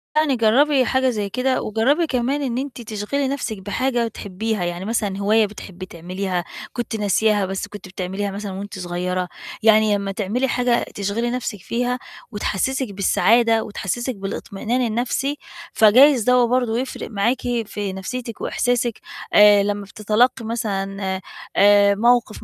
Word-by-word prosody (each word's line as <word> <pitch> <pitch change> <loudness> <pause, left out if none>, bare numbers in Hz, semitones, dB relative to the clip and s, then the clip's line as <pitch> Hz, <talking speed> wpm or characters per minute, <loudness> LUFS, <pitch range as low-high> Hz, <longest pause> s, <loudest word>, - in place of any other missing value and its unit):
يعني 305 -4 +3
جرّبي 255 +4 +3
حاجة 260 -1 +2
زي 210 -4 -2
كده. 255 +3 0
وجرّبي 270 +10 +1
كمان 260 +3 0
إن 250 -3 -2
أنتِ 265 -2 -5
تشغِلي 220 +6 -2
نفْسِك 255 -6 -3
بحاجة 235 +4 -1
بتحبيها، 210 -1 -3
يعني 175 +2 -4
مثلًا 210 -3 -1
هواية 215 +2 +3
بتحبي 190 -2 -9
تعمليها، 180 +1 -4 0.3
كنتِ 240 -2 -3
ناسياها 210 0 +2
بس 195 +1 -4
كنتِ 205 -1 -10
بتعمليها 190 +2 -4
مثلًا 200 0 -5
وأنتِ 200 0 -7
صغيرة. 180 +1 -2 0.4
يعني 215 -1 +5
لمّا 200 -1 -3
تعملي 215 +6 -1
حاجة 245 -1 +1
تشغِلي 205 +4 -1
نفْسِك 245 -5 -3
فيها 245 +4 -2 0.3
وتحسسِك 220 +3 -2
بالسعادة 225 +3 +3
وتحسسِك 240 +4 -3
بالاطمئنان 200 +5 -3
النفْسي، 255 +5 -1 0.4
فجايز 245 +3 +6
دوّة 250 0 +4
برضو 245 -2 +1
يفرِق 255 0 -4
معاكِ 225 +4 0 0.2
في 200 -2 -4
نفسيتِك 230 +4 -6
وإحساسِك 245 -1 0 0.3
آآ، 210 -1 +7
لمّا 205 0 -2
بتتلقي 220 +4 +1
مثلًا 195 -4 -3 0.4
آآ، 200 0 +5
موقف 235 0 +2
220 Hz, 140 wpm, -21 LUFS, 200-245 Hz, 0.4 s, آآ